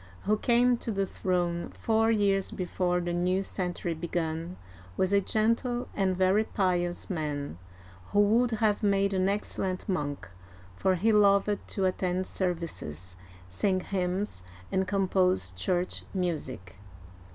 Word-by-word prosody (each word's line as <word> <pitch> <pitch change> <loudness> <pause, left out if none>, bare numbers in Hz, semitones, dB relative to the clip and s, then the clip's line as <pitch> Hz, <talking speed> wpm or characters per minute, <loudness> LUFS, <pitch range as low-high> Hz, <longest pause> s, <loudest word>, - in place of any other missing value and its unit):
who 210 - +2
came 240 +2 +3
to 235 - -6
the 195 -1 0
throne 175 -2 -1
four 225 0 +1
years 200 -3 +2
before 180 -1 -1
the 175 0 -2
new 180 +2 +1
century 180 -3 -2
began, 165 +1 -3 0.4
was 190 +1 +1
a 200 - +5
gentle 230 +4 0
and 190 -2 0
very 190 +3 +4
pious 180 -4 0
man, 145 - -3 0.5
who 205 - +1
would 225 +4 +4
have 215 -2 +1
made 200 -1 +2
an 190 0 +2
excellent 190 -2 -2
monk, 145 - -2 0.5
for 185 - +2
he 215 +6 +2
loved 200 0 +4
to 195 - -1
attend 185 0 0
services, 155 - -3 0.3
sing 185 - 0
hymns, 185 - -2 0.3
and 190 0 +1
compose 185 - +1
church 175 - -1
music. 135 - -3
185 Hz, 130 wpm, -29 LUFS, 175-205 Hz, 0.5 s, a